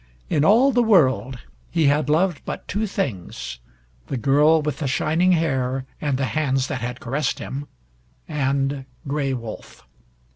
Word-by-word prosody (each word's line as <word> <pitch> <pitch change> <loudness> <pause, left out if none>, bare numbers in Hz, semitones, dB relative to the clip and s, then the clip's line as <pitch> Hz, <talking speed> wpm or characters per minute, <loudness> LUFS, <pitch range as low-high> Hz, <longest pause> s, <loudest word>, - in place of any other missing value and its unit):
In 145 - +3
all 235 - +5
the 245 - +3
world 130 - +3 0.3
he 160 - +1
had 145 0 +2
loved 165 +1 +2
but - - -6
two 215 +2 -1
things, 105 - -4 0.5
the 135 - -3
girl 150 +5 +4
with 150 0 -3
the 145 - -1
shining 160 +6 +2
hair 135 -5 0 0.2
and 145 -3 0
the 135 - 0
hands 135 -4 +1
that 130 -4 -3
had 120 +1 -4
caressed 135 +3 -1
him 140 +2 -6 0.6
and 140 -2 -1 0.2
Gray 140 -1 -1
Wolf. 115 -3 -9
145 Hz, 150 wpm, -23 LUFS, 130-160 Hz, 0.6 s, all